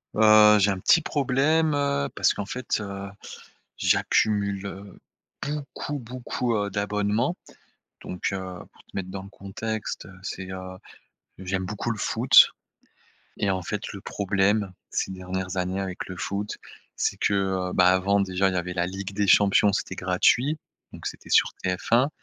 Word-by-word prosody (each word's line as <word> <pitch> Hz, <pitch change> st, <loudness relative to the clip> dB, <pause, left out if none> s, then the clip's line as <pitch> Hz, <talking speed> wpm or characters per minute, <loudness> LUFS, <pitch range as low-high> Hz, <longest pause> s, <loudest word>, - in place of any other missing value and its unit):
Heu, 105 Hz, -1 st, +7 dB
j'ai 100 Hz, +1 st, +4 dB
un 95 Hz, -, -3 dB
petit 165 Hz, -, +5 dB
problème, 150 Hz, +3 st, +1 dB
heu, 140 Hz, -, 0 dB
parce -, -, +3 dB
qu'en 100 Hz, -, -4 dB
fait, 125 Hz, +3 st, -2 dB
heu, 100 Hz, -1 st, -6 dB, 0.7 s
j'accumule, 100 Hz, -2 st, +1 dB
heu, 100 Hz, 0 st, -10 dB, 0.5 s
beaucoup, 145 Hz, 0 st, -4 dB
beaucoup, 125 Hz, 0 st, -3 dB
heu, 105 Hz, -1 st, 0 dB
d'abonnements 105 Hz, -, 0 dB, 0.7 s
donc 90 Hz, -, -3 dB
heu, 95 Hz, -, -2 dB, 0.3 s
pour -, -, -21 dB
te -, -, -27 dB
mettre 95 Hz, -1 st, -4 dB
dans 95 Hz, 0 st, -6 dB
le 100 Hz, -, -12 dB
contexte, 110 Hz, +3 st, -5 dB
heu, 95 Hz, -, -12 dB
c'est, 95 Hz, -2 st, -6 dB
heu, 95 Hz, 0 st, -7 dB, 0.6 s
j'aime 95 Hz, 0 st, -3 dB
beaucoup 105 Hz, +4 st, -3 dB
le 115 Hz, -, -2 dB
foot, -, -, +6 dB, 0.9 s
et 100 Hz, -, +1 dB
en 95 Hz, -1 st, -1 dB
fait 105 Hz, +3 st, -4 dB
le 100 Hz, -, -7 dB
problème, 100 Hz, 0 st, 0 dB, 0.2 s
ces -, -, -1 dB
dernières 95 Hz, 0 st, -4 dB
années 90 Hz, +1 st, -1 dB
avec 95 Hz, -1 st, -5 dB
le 90 Hz, -, -7 dB
foot, 100 Hz, +4 st, -3 dB, 0.4 s
c'est -, -, 0 dB
que, -, -, +1 dB
heu, 95 Hz, -2 st, 0 dB
bah, 90 Hz, 0 st, +5 dB
avant 95 Hz, +2 st, +3 dB
déjà, 95 Hz, 0 st, +1 dB
il 95 Hz, -, -2 dB
y -, -, 0 dB
avait 90 Hz, 0 st, -4 dB
la 85 Hz, -1 st, 0 dB
Ligue 95 Hz, +2 st, -6 dB
des 100 Hz, 0 st, +1 dB
Champions. 100 Hz, +1 st, +5 dB
C'était 95 Hz, -, -2 dB
gratuit, 120 Hz, +11 st, +2 dB, 0.3 s
donc -, -, -9 dB
c'était -, -, -7 dB
sur -, -, +4 dB
TF1, 115 Hz, +8 st, +2 dB
100 Hz, 165 wpm, -25 LUFS, 95-110 Hz, 0.9 s, Heu